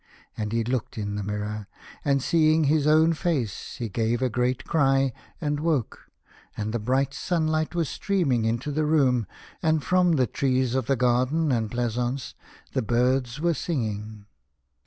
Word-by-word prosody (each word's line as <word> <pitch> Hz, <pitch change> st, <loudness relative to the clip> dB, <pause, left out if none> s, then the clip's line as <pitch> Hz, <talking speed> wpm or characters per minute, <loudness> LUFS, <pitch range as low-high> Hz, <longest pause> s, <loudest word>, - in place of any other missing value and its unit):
And 105 Hz, -1 st, -3 dB
he 115 Hz, 0 st, +1 dB
looked 120 Hz, -1 st, -3 dB
in 100 Hz, -1 st, -3 dB
the 105 Hz, -, -3 dB
mirror, 105 Hz, +1 st, -4 dB, 0.4 s
and, 140 Hz, -2 st, +1 dB
seeing 160 Hz, 0 st, +3 dB
his 150 Hz, 0 st, +2 dB
own 160 Hz, +2 st, +5 dB
face, 150 Hz, -, -2 dB
he 120 Hz, -, -4 dB
gave 115 Hz, +4 st, -1 dB
a 130 Hz, -, +1 dB
great 125 Hz, +2 st, 0 dB
cry 135 Hz, -4 st, +2 dB, 0.3 s
and 150 Hz, -3 st, -1 dB
woke, 150 Hz, -7 st, -2 dB, 0.5 s
and 110 Hz, +1 st, -3 dB
the 120 Hz, -, 0 dB
bright 130 Hz, +5 st, 0 dB
sunlight 155 Hz, -1 st, -1 dB
was 165 Hz, -3 st, +1 dB
streaming 155 Hz, -, 0 dB
into 120 Hz, +6 st, -1 dB
the 155 Hz, +2 st, 0 dB
room, 130 Hz, -, +3 dB, 0.3 s
and 160 Hz, -3 st, +2 dB
from 180 Hz, +3 st, +3 dB
the 130 Hz, -5 st, +3 dB
trees 130 Hz, +1 st, 0 dB
of 130 Hz, 0 st, -1 dB
the 135 Hz, -, +3 dB
garden 130 Hz, +6 st, +2 dB
and 115 Hz, -3 st, 0 dB
pleasaunce 120 Hz, +2 st, -2 dB, 0.4 s
the 130 Hz, -, +1 dB
birds 125 Hz, +3 st, +1 dB
were 170 Hz, +2 st, +2 dB
singing. 110 Hz, -9 st, -3 dB
130 Hz, 160 wpm, -25 LUFS, 115-155 Hz, 0.5 s, own